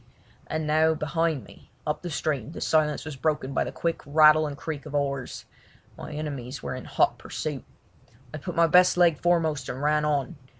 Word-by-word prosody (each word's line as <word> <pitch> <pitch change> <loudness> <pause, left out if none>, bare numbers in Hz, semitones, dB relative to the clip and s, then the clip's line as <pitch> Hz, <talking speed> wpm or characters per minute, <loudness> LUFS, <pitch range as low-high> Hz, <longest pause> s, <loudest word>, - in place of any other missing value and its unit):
And 155 0 -2
now 160 +1 +3
behind 155 -2 -1
me, - - -17 0.2
up 150 - -2
the 175 - -5
stream, 150 -2 -2
the - - -7
silence 155 -2 +1
was 155 -3 -6
broken 145 0 -1
by - - +1
the - - -5
quick 170 -1 -2
rattle 155 +1 +5
and 145 -1 -6
creak 150 0 -6
of 145 - -6
oars; 140 -3 -2 0.5
my - - -8
enemies 140 -4 -5
were - - -3
in 130 - -7
hot - - +1
pursuit. - - -5 0.7
I 155 - -5
put 175 +4 -6
my 170 - +5
best 180 +2 +5
leg 170 -4 +4
foremost 165 -4 +1
and 125 - -5
ran 150 +1 +2
on. 150 +1 -1
150 Hz, 190 wpm, -26 LUFS, 140-160 Hz, 0.7 s, rattle